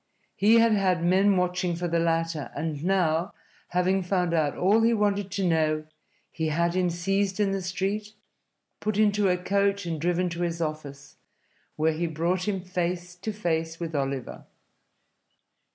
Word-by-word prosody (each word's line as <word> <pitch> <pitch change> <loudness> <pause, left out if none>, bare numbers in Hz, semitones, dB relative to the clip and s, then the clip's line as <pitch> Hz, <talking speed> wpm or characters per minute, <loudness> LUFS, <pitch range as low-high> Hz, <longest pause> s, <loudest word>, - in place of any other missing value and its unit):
He 215 +3 +4
had 230 0 +5
had 185 -5 +2
men 190 +3 +4
watching 180 -1 0
for 175 +1 -3
the 170 0 +1
latter 165 -2 -1
and 150 -1 -3
now, 175 -1 +1 0.3
having 185 +2 +1
found 180 -2 0
out 155 -3 +1
all 205 +5 +3
he 230 +1 +3
wanted 205 -2 0
to 195 -2 0
know, 155 -2 +1 0.5
he 160 -1 -2
had 170 +2 +1
him 180 -1 +1
seized 195 +3 -1
in 200 -2 +2
the 195 0 -1
street, 195 +3 -3 0.7
put 215 -1 -2
into 210 -2 +3
a 180 - +2
coach 200 +1 0
and 165 -3 -3
driven 175 +1 +1
to 170 +1 -5
his 170 -1 -2
office, 145 -3 -5 0.6
where 160 +1 +1
he 170 +2 -2
brought 170 +4 -1
him 195 -3 -1
face 180 -1 -3
to 215 +5 -4
face 165 -5 -2
with 165 -2 -4
Oliver. 135 -2 -3
180 Hz, 165 wpm, -26 LUFS, 165-195 Hz, 0.7 s, had